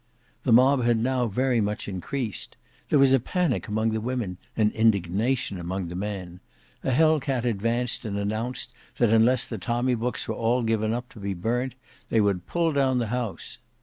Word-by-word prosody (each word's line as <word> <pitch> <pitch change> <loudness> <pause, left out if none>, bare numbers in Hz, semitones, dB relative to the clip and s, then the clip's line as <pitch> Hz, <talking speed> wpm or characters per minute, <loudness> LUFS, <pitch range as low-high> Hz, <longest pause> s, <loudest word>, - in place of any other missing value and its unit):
The 125 - +2
mob 130 +3 +5
had 120 -1 +3
now 125 +1 +1
very 125 +2 +1
much 105 +1 -2
increased. 105 +5 -4 0.3
There - - +4
was 135 -1 +5
a 135 - +5
panic 165 - -1
among 110 +1 0
the 110 0 -1
women, 115 -6 -3 0.2
and 105 -1 +3
indignation 110 +1 +1
among 90 +1 -3
the 90 - -6
men: 95 -3 -5 0.4
a - - 0
Hell 155 +4 +4
cat 130 -3 -2
advanced 120 +2 0
and 105 -3 -3
announced 110 +5 -2 0.3
that 120 -3 +3
unless 115 +2 +4
the 115 - -6
tommy 120 +6 0
books 120 +1 -2
were - - -1
all 120 +2 +1
given 110 -1 +1
up 120 +2 -3
to - - -13
be 100 -1 -3
burnt, 120 +7 -1 0.3
they 115 - +3
would 100 -4 +1
pull 170 -2 +1
down 135 -2 +2
the 115 -3 -1
house. 120 0 -4
115 Hz, 185 wpm, -26 LUFS, 105-125 Hz, 0.4 s, mob